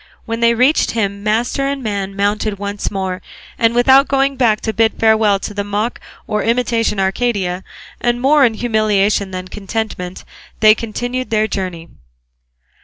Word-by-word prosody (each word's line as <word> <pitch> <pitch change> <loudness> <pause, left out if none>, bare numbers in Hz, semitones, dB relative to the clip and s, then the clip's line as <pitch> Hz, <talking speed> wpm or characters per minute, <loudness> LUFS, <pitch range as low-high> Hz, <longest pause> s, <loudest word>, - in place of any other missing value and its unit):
When 230 0 -3
they 235 0 +3
reached 255 +6 +2
him 200 -2 -1
master 235 +6 0
and 275 -1 -3
man 200 -3 -3
mounted 205 +1 -1
once 200 +1 -4
more, 190 -2 -3 0.4
and 230 0 +2
without 265 +3 +5
going 275 0 +1
back 230 -5 +2
to 220 - -2
bid 225 0 +2
farewell 220 -2 +4
to 205 - -6
the 205 0 -2
mock 205 +3 -2 0.3
or 210 0 -1
imitation 230 -3 0
Arcadia, 190 -2 -1 0.4
and 240 0 0
more 280 +3 +4
in 230 -3 +3
humiliation 210 -3 +1
than 185 0 -6
contentment, 195 -2 -5 0.3
they 215 0 +7
continued 245 +3 -4
their 215 -1 +1
journey. 180 -5 -4
215 Hz, 155 wpm, -17 LUFS, 200-240 Hz, 0.4 s, they